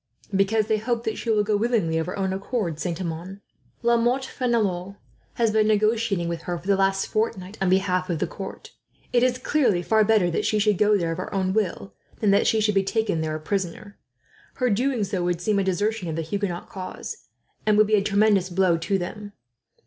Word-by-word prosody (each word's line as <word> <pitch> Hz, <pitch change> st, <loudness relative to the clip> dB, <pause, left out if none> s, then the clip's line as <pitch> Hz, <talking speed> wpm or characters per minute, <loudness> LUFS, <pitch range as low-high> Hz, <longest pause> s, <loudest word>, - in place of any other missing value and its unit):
"Because 205 Hz, +3 st, +2 dB
they 215 Hz, 0 st, +1 dB
hope 235 Hz, +1 st, -1 dB
that 220 Hz, -1 st, -3 dB
she 235 Hz, -, -4 dB
will 215 Hz, -2 st, +3 dB
go 210 Hz, 0 st, +1 dB
willingly, 205 Hz, -7 st, +1 dB
of 160 Hz, -, -2 dB
her 180 Hz, -, -4 dB
own 190 Hz, -1 st, -1 dB
accord, 195 Hz, -5 st, -3 dB
Saint 175 Hz, -1 st, -3 dB
Amand. 180 Hz, +2 st, -5 dB, 0.4 s
La 235 Hz, 0 st, +4 dB
Motte 245 Hz, +3 st, +1 dB
Fenelon 205 Hz, -8 st, -1 dB, 0.4 s
has 230 Hz, -2 st, +2 dB
been 215 Hz, 0 st, +3 dB
negotiating 215 Hz, -3 st, +1 dB
with 170 Hz, -1 st, -3 dB
her, 175 Hz, 0 st, -3 dB
for 170 Hz, -, -13 dB
the 200 Hz, 0 st, +3 dB
last 195 Hz, 0 st, +1 dB
fortnight, 205 Hz, -3 st, -2 dB
on 190 Hz, -, +2 dB
behalf 185 Hz, 0 st, +1 dB
of 170 Hz, -, 0 dB
the -, -, 0 dB
court. -, -, -8 dB, 0.4 s
It 240 Hz, -, +4 dB
is 250 Hz, 0 st, +2 dB
clearly 255 Hz, -9 st, +1 dB
far 220 Hz, +4 st, +3 dB
better 210 Hz, -5 st, +3 dB
that -, -, -1 dB
she 215 Hz, -, +1 dB
should 210 Hz, -2 st, +2 dB
go 210 Hz, 0 st, +4 dB
there 170 Hz, -3 st, -1 dB
of 165 Hz, -, -4 dB
her -, -, -5 dB
own 190 Hz, -1 st, 0 dB
will, 175 Hz, -, -2 dB, 0.3 s
than 210 Hz, -3 st, +3 dB
that 200 Hz, -, +3 dB
she 220 Hz, -, +3 dB
should 210 Hz, 0 st, +2 dB
be 195 Hz, -, +3 dB
taken 195 Hz, -4 st, -1 dB
there 155 Hz, -1 st, -2 dB
a -, -, -4 dB
prisoner. 195 Hz, +4 st, -4 dB, 0.6 s
Her 250 Hz, -3 st, +1 dB
doing 245 Hz, +2 st, +1 dB
so 190 Hz, -2 st, -2 dB
would 175 Hz, -1 st, 0 dB
seem 200 Hz, +3 st, +1 dB
a -, -, +1 dB
desertion 195 Hz, 0 st, -1 dB
of 160 Hz, -, -3 dB
the 165 Hz, -, -2 dB
Huguenot 180 Hz, +1 st, -3 dB
cause, 185 Hz, -1 st, -7 dB, 0.5 s
and 210 Hz, -1 st, +4 dB
would 215 Hz, -, +6 dB
be 215 Hz, -, -2 dB
a 210 Hz, -, +5 dB
tremendous 200 Hz, -2 st, +2 dB
blow 180 Hz, -1 st, +2 dB
to 195 Hz, +4 st, 0 dB
them. 205 Hz, +3 st, -6 dB
200 Hz, 220 wpm, -24 LUFS, 180-220 Hz, 0.6 s, would